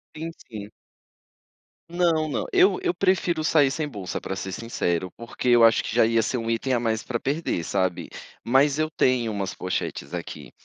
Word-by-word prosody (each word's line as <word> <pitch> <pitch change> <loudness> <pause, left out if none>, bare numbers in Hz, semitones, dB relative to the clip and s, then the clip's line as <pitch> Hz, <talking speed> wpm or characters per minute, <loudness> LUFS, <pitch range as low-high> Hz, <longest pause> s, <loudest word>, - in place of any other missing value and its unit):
Sim, 165 +2 -5 0.2
sim. 105 -2 -7 1.2
Não, 170 -3 +1
não, 145 - -2
eu 380 +1 +4
eu 360 -1 +1
prefiro 175 -4 +1
sair 145 -4 +4
sem 150 +1 -2
bolsa, 100 -9 -5
para 95 - -5
ser 95 0 -5
sincero, 90 -5 -2
porque 115 +2 -6
eu 120 -1 +6
acho 115 0 +6
que 110 - -5
já 115 - +5
ia 115 0 +2
ser 125 - -2
um 115 0 -3
item 130 +3 -1
a 120 - +2
mais 110 -1 0
para 120 - -3
perder, 140 - -2
sabe. 95 -2 -1 0.3
Mas 135 +4 +3
eu 155 0 0
tenho 125 -6 +1
umas 100 -2 -3
pochetes 90 -4 -4
aqui. 90 - -7
120 Hz, 185 wpm, -25 LUFS, 105-155 Hz, 1.2 s, eu